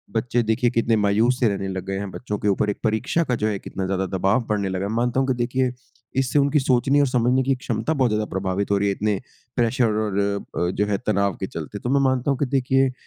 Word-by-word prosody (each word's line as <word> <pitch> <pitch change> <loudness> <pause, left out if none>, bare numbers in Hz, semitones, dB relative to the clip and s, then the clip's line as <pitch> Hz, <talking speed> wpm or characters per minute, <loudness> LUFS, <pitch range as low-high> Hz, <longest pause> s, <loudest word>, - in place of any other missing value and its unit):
बच्चे 120 +2 +1
देखिए 115 +3 +1
कितने 115 -1 +1
मायूस 110 +5 +2
से 120 - +3
रहने 95 -1 -2
लग 95 -1 -4
गए 95 0 -3
हैं, 100 0 -4
बच्चों 105 -2 -4
के 105 - -2
ऊपर 100 +1 +2
एक 100 - -3
परीक्षा 110 +9 +1
का 125 -5 0
जो - - +3
है 100 -3 -1
कितना 95 - -5
ज़्यादा 95 0 -1
दबाव 95 +7 +2
बढ़ने 100 -2 0
लगा। 95 +1 -2
मानता 120 +2 +1
हूँ 135 - +1
कि 130 - +2
देखिए, 130 +1 0 0.4
इससे 135 +1 +2
उनकी 140 +1 +3
सोचने 135 +2 +2
और 140 - +4
समझने 125 +1 +2
की 135 - 0
एक 130 - +2
क्षमता 160 - -1
बहुत 130 -5 +2
ज़्यादा 105 0 0
प्रभावित 95 +1 -2
हो 100 - +4
रही 100 +1 +1
है, 100 - 0
इतने 105 -2 0 0.4
प्रेशर 120 +1 +2
और 105 -2 0
अ 100 0 -2
अ, - - 0
जो 105 +2 0
है 100 - 0
तनाव 100 -1 +1
के 95 - -3
चलते। 85 +5 -6
तो 120 - -4
मैं 140 +1 +3
मानता 130 +2 0
हूँ 135 - 0
कि 145 - +2
देखिए, 135 0 +2
110 Hz, 255 wpm, -23 LUFS, 100-130 Hz, 0.4 s, और